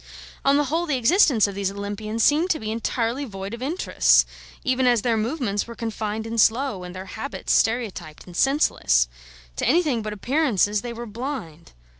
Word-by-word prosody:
On 275 Hz, +1 st, +4 dB
the 295 Hz, -, +3 dB
whole, 325 Hz, +5 st, -1 dB
the 285 Hz, -4 st, +1 dB
existence 260 Hz, -, +4 dB
of 200 Hz, -, -3 dB
these 195 Hz, -1 st, -1 dB
Olympians 205 Hz, +3 st, -3 dB
seemed 315 Hz, +5 st, +3 dB
to 320 Hz, -, +1 dB
be 215 Hz, 0 st, -4 dB
entirely 230 Hz, +3 st, -1 dB
void 195 Hz, -4 st, -7 dB
of 235 Hz, -, -7 dB
interests, 310 Hz, +8 st, +3 dB, 0.4 s
even 255 Hz, 0 st, +1 dB
as 240 Hz, -3 st, +3 dB
their 235 Hz, -2 st, +2 dB
movements 225 Hz, -3 st, -1 dB
were 235 Hz, -, -8 dB
confined 220 Hz, -1 st, -4 dB
and 225 Hz, 0 st, +1 dB
slow, 230 Hz, -4 st, +2 dB
and 180 Hz, 0 st, -8 dB
their 185 Hz, +1 st, -7 dB
habits 275 Hz, +8 st, -4 dB
stereotyped 220 Hz, -9 st, -1 dB
and 180 Hz, -, -12 dB
senseless. 270 Hz, -, +2 dB, 0.5 s
To -, -, 0 dB
anything 290 Hz, -5 st, +2 dB
but 215 Hz, 0 st, -5 dB
appearances 210 Hz, -, +1 dB
they 240 Hz, -, -5 dB
were 235 Hz, +1 st, -6 dB
blind. 220 Hz, -, -7 dB
230 Hz, 180 wpm, -23 LUFS, 205-270 Hz, 0.5 s, On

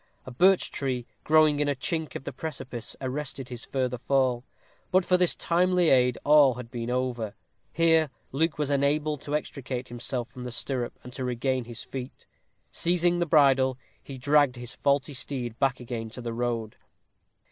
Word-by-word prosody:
A 130 Hz, -, -8 dB
birch 185 Hz, +9 st, +4 dB
tree, 130 Hz, -3 st, -2 dB, 0.2 s
growing 155 Hz, -1 st, +4 dB
in 150 Hz, -, +2 dB
a 145 Hz, -, +1 dB
chink 160 Hz, +2 st, -3 dB
of -, -, -5 dB
the -, -, -6 dB
precipice, 130 Hz, -7 st, -6 dB
arrested 135 Hz, -1 st, -4 dB
his 120 Hz, -2 st, -7 dB
further 125 Hz, -2 st, -2 dB
fall. 130 Hz, -2 st, +1 dB, 0.5 s
But 185 Hz, 0 st, +3 dB
for 180 Hz, -, +4 dB
this 180 Hz, -1 st, +3 dB
timely 180 Hz, 0 st, +2 dB
aid 125 Hz, -2 st, +4 dB
all 145 Hz, -4 st, +6 dB
had 125 Hz, -1 st, -9 dB
been 120 Hz, -2 st, -4 dB
over. 125 Hz, -4 st, -2 dB, 0.4 s
Here 165 Hz, -2 st, +4 dB, 0.2 s
Luke 155 Hz, +2 st, 0 dB
was 150 Hz, -1 st, -1 dB
enabled 145 Hz, +1 st, +1 dB
to 150 Hz, 0 st, -3 dB
extricate 130 Hz, -4 st, -4 dB
himself 120 Hz, 0 st, -3 dB
from 125 Hz, -1 st, -9 dB
the 125 Hz, -, -5 dB
stirrup 120 Hz, 0 st, -1 dB
and 125 Hz, -, -10 dB
to 130 Hz, -, -4 dB
regain 125 Hz, 0 st, -1 dB
his 115 Hz, -1 st, -6 dB
feet; 130 Hz, -1 st, -8 dB, 0.5 s
seizing 175 Hz, 0 st, +2 dB
the 175 Hz, -, 0 dB
bridle, 135 Hz, -4 st, +4 dB, 0.2 s
he 135 Hz, -, -9 dB
dragged 145 Hz, 0 st, +3 dB
his 120 Hz, -1 st, -6 dB
faulty 140 Hz, 0 st, 0 dB
steed 125 Hz, -3 st, -4 dB
back 135 Hz, -1 st, +1 dB
again 115 Hz, -2 st, -5 dB
to 125 Hz, -, -8 dB
the 115 Hz, -1 st, -3 dB
road. 115 Hz, -2 st, -3 dB
135 Hz, 175 wpm, -27 LUFS, 125-150 Hz, 0.5 s, all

